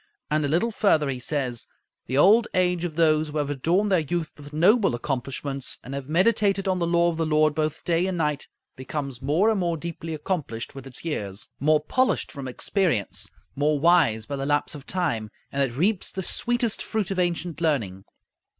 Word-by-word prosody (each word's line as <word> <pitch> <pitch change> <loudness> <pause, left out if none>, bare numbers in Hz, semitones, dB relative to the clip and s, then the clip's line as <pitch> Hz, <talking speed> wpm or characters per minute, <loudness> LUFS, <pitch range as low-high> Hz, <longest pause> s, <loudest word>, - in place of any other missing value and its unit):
And 155 0 +2
a - - +1
little 175 +11 +1
further 160 -9 +2
he 130 -2 -3
says, 125 -3 -2 0.4
"The 130 - -1
old 215 +9 +6
age 180 -1 +2
of 160 -3 -5
those 155 -1 +3
who 150 - -4
have 145 -1 -1
adorned 175 +9 +1
their 185 - +5
youth 160 +1 -2
with 145 0 -12
noble 185 - +4
accomplishments 135 +1 -3
and 130 - -8
have 140 0 -5
meditated 195 +2 +2
on 185 -1 +1
the 170 - 0
law 170 0 +3
of 165 - -6
the 165 - 0
Lord 155 0 +3
both 155 0 -2
day 175 +1 +1
and 185 -2 -2
night 150 -3 -1 0.3
becomes 135 -1 -5
more 160 +11 +3
and 215 - 0
more 170 -2 0
deeply 165 0 -5
accomplished 150 -8 -4
with 135 -1 -9
its 135 +5 -10
years, 100 - -4
more 155 +2 +4
polished 255 +12 0
from 140 -2 -6
experience, 155 - 0 0.3
more 145 +1 +1
wise 150 -10 +4
by 140 - -4
the 135 - -3
lapse 145 +3 +1
of 145 -2 -10
time; 135 -13 -1 0.2
and 140 - -1
it 130 -3 -1
reaps 190 +5 +1
the 190 - -4
sweetest 240 +2 -1
fruit 210 -3 -2
of 190 - -1
ancient 175 -2 -1
learning." 110 - 0
155 Hz, 195 wpm, -25 LUFS, 140-180 Hz, 0.4 s, old